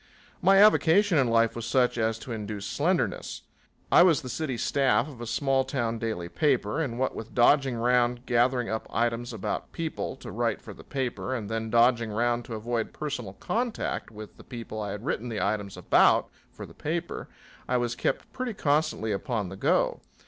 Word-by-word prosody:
My 195 +2 +5
avocation 200 -3 +5
in 130 - +3
life 115 -1 +3
was 115 0 -5
such 125 +1 +2
as 110 -1 0
to 120 - -9
induce 105 -2 -5
slenderness. - - -1 0.5
I - - +8
was 170 -6 +5
the 130 - -6
city 135 -2 -3
staff 135 +1 +2
of 130 -6 -11
a 120 - -5
small 135 +2 +1
town 120 -4 -2
daily 110 -7 -3
paper, 135 - +1
and 125 -7 -3
what 130 +1 0
with 110 - -8
dodging 135 +1 +4
round 120 +1 +1
gathering 120 0 +2
up 110 0 -3
items 120 +1 -1
about 110 -4 -4
people 165 -1 -4
to - - -9
write - - -1
for - - -10
the - - -14
paper 130 -1 -3
and 110 -5 -5
then 110 0 -2
dodging 120 0 +3
round 120 +2 0
to 115 - -6
avoid 115 +1 -3
personal 125 -10 -5
contact 230 - -2
with 105 -1 -11
the - - -13
people 115 -3 -7
I 105 - -3
had 105 +4 -6
written 125 -4 -2
the 110 -2 -3
items 100 -3 -2
about 90 - +4 0.2
for - - -9
the - - -14
paper, 170 +3 -4 0.4
I 125 - +2
was 120 -1 -1
kept - - -2
pretty 255 -4 -3
constantly 150 - +1
upon 105 -1 -2
the 95 - -8
go. - - +1
120 Hz, 190 wpm, -27 LUFS, 110-135 Hz, 0.5 s, I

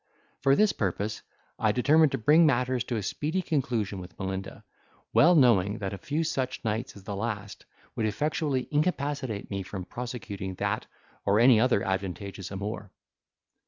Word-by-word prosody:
For 135 0 +4
this 210 +3 +4
purpose, 100 +1 -2 0.4
I 110 -2 +3
determined 145 +6 +4
to - - +1
bring 150 +8 +5
matters 125 -4 +2
to 120 - -2
a 105 - -2
speedy 160 - -2
conclusion 115 - -1
with 90 0 -11
Melinda; 95 0 -5 0.5
well 175 +3 +6
knowing 110 - +4
that 100 -3 -4
a 100 - -6
few 150 - -1
such 130 -5 -2
nights 110 +3 -2
as 100 - -12
the 100 - -5
last 105 -2 -4 0.3
would 110 - 0
effectually 145 +2 -1
incapacitate 145 - -1
me 100 0 -2
from 95 -1 -6
prosecuting 100 -5 -6
that - - -2 0.4
or 100 +1 +3
any 120 -1 +7
other 120 -4 +3
advantageous 95 0 -3
amour. 100 +1 -5
115 Hz, 160 wpm, -28 LUFS, 100-135 Hz, 0.5 s, any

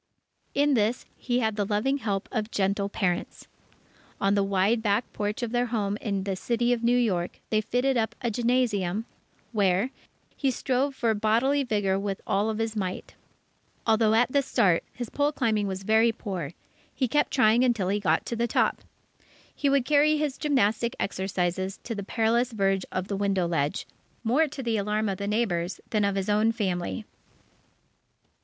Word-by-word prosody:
In 285 +1 +3
this, 230 0 +1
he 245 0 -1
had 220 -2 0
the 205 - +1
loving 215 +8 0
help 200 -5 -2
of 220 -2 -2
gentle 200 -1 0
parents. 180 -4 -2 0.7
On 195 0 +2
the 200 -1 +3
wide 195 +4 +2
back 210 +2 0
porch 210 +3 -2
of 235 - -2
their 245 0 +1
home 205 -4 -1
in 200 -3 -2
the 195 -1 -2
City 240 +4 +1
of 235 -1 -3
New 240 +1 +4
York, 185 -8 0
they 215 -1 +3
fitted 250 +4 0
up 220 -1 0
a 240 -3 -1
gymnasium, 225 -4 0 0.5
where 200 +2 +2 0.4
he 275 - 0
strove 265 +2 0
for 230 -3 +1
bodily 230 +7 +2
vigour 205 -5 0
with 200 -1 -3
all 205 +3 +1
his 225 0 -2
might. 185 -3 -4 0.7
Although 220 -1 +3
at 245 +3 +3
the 280 - +3
start, 180 -9 +2
his 240 -3 -6
pole 290 +1 +1
climbing 220 -8 0
was 190 0 -4
very 220 +3 +4
poor, 185 -9 -5 0.4
he 260 - +1
kept 295 +5 +2
trying 240 -2 +4
until 225 -7 +1
he 205 +1 +1
got 165 -5 +1
to 235 - -3
the 235 +1 0
top. - - +1 0.7
He 285 - 0
would 275 -2 +2
carry 300 +1 +4
his 295 -3 -1
gymnastic 235 -6 +1
exercises 190 0 -2
to 235 - -4
the 205 - -4
perilous 230 +4 +1
verge 195 -2 +1
of 185 0 -3
the 200 - -2
window 195 -3 +1
ledge, 150 -4 -1 0.4
more 265 +8 +3
to 270 -1 -7
the 230 -2 0
alarm 210 +1 0
of 190 - -3
the 200 - -3
neighbours 200 -5 -1
than 215 -2 +2
of 200 -1 +1
his 195 0 -2
own 215 +2 +3
family. 200 -1 -2
215 Hz, 175 wpm, -27 LUFS, 195-245 Hz, 0.7 s, New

